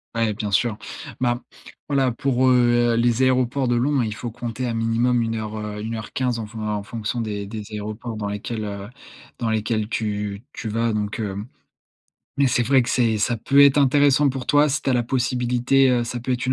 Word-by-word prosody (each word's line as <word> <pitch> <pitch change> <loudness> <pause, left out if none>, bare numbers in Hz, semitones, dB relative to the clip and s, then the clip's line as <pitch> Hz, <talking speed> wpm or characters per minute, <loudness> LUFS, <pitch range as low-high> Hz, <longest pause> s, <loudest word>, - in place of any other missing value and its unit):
Ouais, 115 -2 +1
bien 105 0 -4
sûr. 105 +2 +1 0.4
Ben, 120 0 0 0.5
voilà 135 -3 +2
pour, 130 +1 +1
heu, 120 -1 +4
les 120 +1 +2
aéroports 130 0 +2
de 120 - +2
Londres, 135 +2 +2
il 110 - -3
faut 120 +2 -5
compter 120 +1 -4
à 120 - -2
minimum 115 +2 +1
1:00, 110 -1 -3
heu, 105 -1 -5
1:15 115 +2 -2
en 110 - -4
fon 110 +1 -8
en 105 -1 -2
fonction 110 +2 -4
des 105 -3 -3
des 105 +1 -6
aéroports 110 +2 -5
dans 105 -1 -3
lesquels, 110 +2 -4
heu, 100 -1 -5 0.5
dans 115 - -1
lesquels 110 -1 -1
tu 105 -2 -3
tu 110 - -5
vas 115 +1 0
donc, 105 +1 -2
heu 100 -3 -3 1.0
mais 140 -1 +4
c'est 120 -1 +1
vrai 130 +1 +4
que 120 - -5
c'est 115 -3 +2
ça 115 +3 0
peut 140 +5 +3
être 140 0 +6
intéressant 145 +1 +4
pour 130 -1 -3
toi 145 0 +4
si 145 +1 -1
tu - - 0
as - - +3
la 120 -1 +1
possibilité, 125 +1 +2
heu 125 -1 +2
ça 120 +1 -4
peut 125 +2 -2
être 120 - -2
une 130 - +2
120 Hz, 205 wpm, -22 LUFS, 110-125 Hz, 1.0 s, être